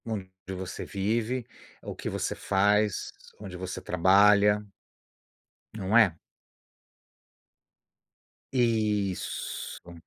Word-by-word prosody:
Onde 105 -4 -4 0.2
você 95 0 -5
vive, 115 +5 -1 0.4
o - - -6
que - - -5
você - - -2
faz, 105 +1 +1 0.3
onde 100 -3 -8
você 90 0 -5
trabalha. 100 +3 +4 1.1
Não 105 +1 +1
é? 105 -7 +6 2.4
Isso. 105 -7 -1
105 Hz, 80 wpm, -28 LUFS, 95-110 Hz, 2.4 s, é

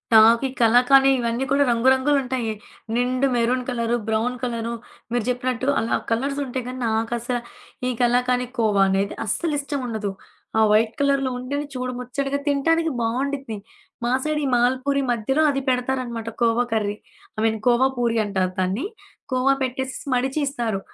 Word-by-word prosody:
నాకు 225 +3 +7
ఈ - - -6
కలాకానీ 250 +4 +6
ఇవన్నీ 235 +2 -1
కూడా 280 +1 +4
రంగు 235 +2 +3
రంగులుంటాయి. 260 -4 0 0.4
నిండు 255 +2 +1
మెరూన్ 245 +2 +1
కలరు, 235 -1 0
బ్రౌన్ 225 +3 0
కలరు 235 -1 -2 0.4
మీరు 240 -2 0
జెప్పినట్టు 250 +1 -1
అలా 225 - 0 0.2
కలర్సుంటయి 265 +1 -1
గానీ, 255 0 -6
నాకసలా 235 +2 -1 0.5
ఈ - - +1
కలాకానీ 250 +1 +2
కోవా 210 -4 +2
అనేది 195 +1 0
అస్సలు 305 +9 -1
ఇష్టముండదు. 245 -8 -3 0.5
ఆ - - +5
వైట్ 220 +1 +3
కలర్‌లో 275 -2 +2
ఉంటేనే 285 +4 -3
చూడ 255 0 -2
ముచ్చటగా 275 +3 -2
తినటానికి 325 +3 +2
బావుండిద్ది. 260 0 -2 0.5
మా 240 - +1
సైడ్ 305 0 0
ఈ - - 0
మాల్పూరి 260 +3 +1
మధ్యలో 240 +6 +1
అది 275 -1 0
పెడతారనమాట 250 -3 -1
khoa 235 +1 +3
curry. 210 -2 0 0.4
I - - -1
mean 220 -1 +1
khoa 245 +2 +5
puri 235 -1 +1
అంటారు 190 -2 -1
దాన్ని. 190 - 0 0.5
కోవా 255 +2 +3
పెట్టేసేసి 265 +3 -3
మడిచీ 265 +4 0
ఇస్తారు. 235 -7 -2
250 Hz, 145 wpm, -23 LUFS, 230-270 Hz, 0.5 s, నాకు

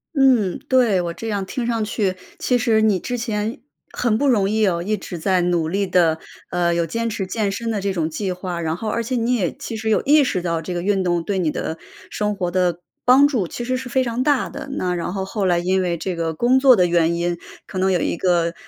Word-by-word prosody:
嗯， 255 -8 +3
对， 240 -8 +4
我 170 -1 -3
这 225 +6 -7
样 200 -2 -1
听 235 +5 -4
上 230 -2 0
去， 205 -3 -1 0.2
其 250 - 0
实 225 -2 +2
你 205 -4 +3
之 245 +6 -3
前 220 -1 -3 0.3
很 235 -3 0
不 280 +5 +1
容 210 -7 +3
易 215 +2 +1
哦， 170 -1 0
一 215 +2 0
直 185 -3 -7
在 185 +2 +1
努 175 -2 +1
力 195 +3 -1
地， 170 -3 +3 0.3
呃， 175 -1 +1
有 170 0 +1
坚 230 +7 -2
持 200 -2 -3
健 200 +1 -1
身 230 +3 -3
的 205 -3 -2
这 200 - -1
种 165 -4 -1
计 185 +4 -3
划， 180 -1 -4
然 160 +1 -2
后， 215 +1 -3
而 235 - -1
且 240 +3 -3
你 240 +1 +1
也 190 -8 0
其 225 - -6
实 220 0 -3
有 215 - +2
意 295 +1 +5
识 185 -8 -1
到 165 -2 -1
这 175 +3 -5
个 175 - -2
运 195 -1 +1
动 175 -2 0
对 195 0 -1
你 165 -4 +1
的 160 +2 -4 0.3
生 210 0 -1
活 180 -3 -2
的 175 -1 0 0.2
帮 265 +3 +6
助， 235 - -1
其 240 - -6
实 255 - 0
是 255 0 -5
非 260 +1 +2
常 240 0 -2
大 285 -1 +2
的。 280 0 -7
那 180 -9 -1
然 175 0 -3
后 190 -1 -3
后 195 0 -1
来 175 -1 +3
因 185 +2 +1
为 175 -2 -1
这 180 +2 -3
个 165 -1 -2
工 245 +8 +3
作 260 -2 +7
的 180 -4 +3
原 170 -1 +2
因， 170 0 -1 0.3
可 185 - -5
能 190 +1 +2
有 180 - +2
一 - - -1
个， 170 -2 +1
195 Hz, 275 characters per minute, -21 LUFS, 175-230 Hz, 0.3 s, 作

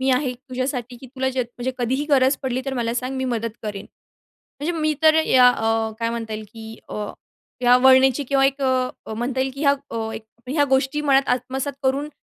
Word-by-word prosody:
मी 265 0 +1
आहे 255 0 +1
तुझ्यासाठी, 255 -1 -4
की 260 - -12
तुला 265 +1 -2
जे, 260 -1 -1
म्हणजे 240 +2 -5
कधीही 260 +4 0
गरज 265 0 +4
पडली, 260 -1 -1
तर 270 - -2
मला 235 -1 -1
सांग, 255 +2 -3
मी 260 - -2
मदत 230 -2 -2
करेन. 205 -2 -5 0.7
म्हणजे 330 +4 -1
मी 310 0 +1
तर 315 0 +6
या 250 -1 +6
अ, 225 -2 0
काय 230 0 0
म्हणता 225 -2 -4
येईल, 215 0 -6
की 225 0 -10
अ, 210 -1 -4 0.6
या 245 0 +7
वळणाची, 265 +2 +5
किंवा 270 +1 +2
एक 275 0 -2
अ, 255 -3 -1
म्हणता 245 +3 -2
येईल, 265 0 -1
की 275 - -8
या 280 -1 +5 0.2
अ, 225 -1 -3 0.4
ह्या 290 +1 +2
गोष्टी 265 +2 +1
मनात 275 -2 +3
आत्मसात 260 +3 -1
करून, 275 +3 0
260 Hz, 200 wpm, -22 LUFS, 240-270 Hz, 0.7 s, या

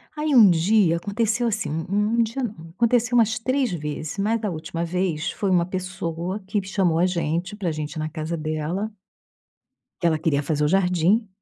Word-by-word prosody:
Aí, 300 0 -1
um 215 -5 +9
dia, 175 +1 +3
aconteceu 220 +5 0
assim. 220 -8 -1 0.2
Um 210 +3 +1
um - - +6
dia 230 +4 -3
não. 175 -8 -6
Aconteceu 240 +2 +2
umas 220 -1 +3
3 255 -1 0
vezes. 150 +1 -4
Mas, 220 +3 +1
da 210 -2 -2
última 165 +1 -4
vez, 180 -1 -1
foi 200 - -2
uma 175 -2 +3
pessoa 185 0 -4
que 205 +1 0
chamou 190 -4 +1
a 180 - +4
gente 170 +1 -1
pra 185 -5 -2
gente 150 -1 -4
ir 155 - -6
na 155 - -2
casa 160 +1 -4
dela. 155 +7 -3 1.1
Ela 165 -2 +2
queria 150 -2 +1
fazer 150 0 0
o - - +2
jardim 190 +4 +2
185 Hz, 185 wpm, -23 LUFS, 160-215 Hz, 1.1 s, um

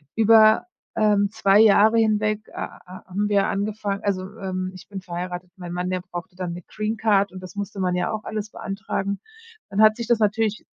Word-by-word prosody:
über, 220 +1 +6 0.3
ähm, 205 -2 +3
2 205 -2 +4
Jahre 220 +1 +6
hinweg 215 -1 +1
ha - - -6
ha 185 +1 -11
haben 200 +3 -1
wir 200 -1 +2
angefangen 205 0 -2
also, 200 -2 0 0.2
ähm, 185 -1 -3
ich 185 - -12
bin 195 -2 -7
verheiratet. 180 0 -6
Mein 175 -1 -7
Mann, 180 +1 -2
der 185 0 -2
brauchte 180 +2 -8
dann 180 -2 -4
'ne 175 - -7
Greencard 215 -2 0
und 185 - -9
das 185 +1 -10
musste 200 0 -5
man 180 -1 0
ja 180 0 -1
auch 215 0 -4
alles 215 -1 -4
beantragen. 195 0 -4 0.5
Dann 200 +2 +1
hat 215 0 +6
sich 235 - -4
das 235 -1 +3
natürlich 215 0 0
200 Hz, 195 wpm, -23 LUFS, 185-215 Hz, 0.5 s, über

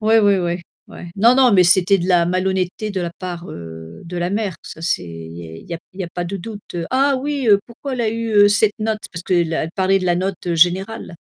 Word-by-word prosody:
Ouais, 220 +1 +4
ouais, 205 -2 +4
ouais, 175 0 -2 0.3
ouais. 175 - -10
Non 230 +5 +5
non 255 -3 +5
mais 185 -2 +6
c'était 185 +2 +4
de 175 - -2
la 175 -2 +4
malhonnêteté 185 +3 -1
de 195 -2 -3
la 170 -1 -2
part, 180 -2 -6
heu, 80 -1 -9
de 175 +1 -7
la 175 0 -1
mère, 205 -3 -2
ça 160 - -10
c'est 170 - 0
il 80 -1 -9
y 85 -1 -8
est 80 0 -10
il - - -18
y - - -2
a 165 - -5
p - - -40
il 195 - -9
y - - -1
a - - -7
pas 175 - -3
de 190 +3 -4
doute. 205 0 -8
«Ah 275 +1 +3
oui, 280 0 -2
heu, 205 -1 +7
pourquoi 245 +4 -7
elle 250 - -3
a 225 - +1
eu, 230 0 -3
heu, 205 -1 +7
cette 205 0 +2
note?» 215 0 -1
parce 165 -1 -6
qu'elle 170 -3 0
parlait 190 0 +3
de 185 - -4
la 175 -1 +2
note 180 -1 -2
générale. 180 +5 +1
185 Hz, 270 wpm, -20 LUFS, 175-215 Hz, 0.3 s, heu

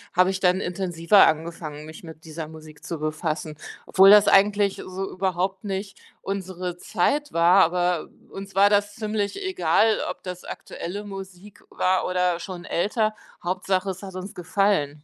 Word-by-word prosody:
habe 185 +1 +4
ich 190 - -3
dann 180 0 +3
intensiver 180 +1 +3
angefangen, 155 -1 -3
mich 155 +2 -11
mit 160 0 -12
dieser 160 0 -6
Musik 155 -1 -13
zu 170 - -5
befassen. 155 0 -3 0.3
Obwohl 195 +1 +6
das 210 0 +8
eigentlich 200 0 +4
so 190 +1 -5
überhaupt 190 +1 -2
nicht 195 0 -5 0.2
unsere 185 -2 -4
Zeit 290 +12 0
war, 175 +3 +5
aber 175 -1 0 0.2
uns 195 0 -9
war 200 +1 +6
das 205 0 +1
ziemlich 215 - -2
egal, 360 -12 +2
ob - - -7
das 180 -1 -7
aktuelle 200 +5 -7
Musik 195 0 -10
war 185 0 +1
oder 180 -1 +1
schon 180 -1 -8
älter, 215 +4 0 0.3
Hauptsache, 185 +2 -1
es 190 +1 -9
hat 190 -2 -9
uns 185 +2 -7
gefallen. 180 -5 0
185 Hz, 155 wpm, -24 LUFS, 170-195 Hz, 0.3 s, das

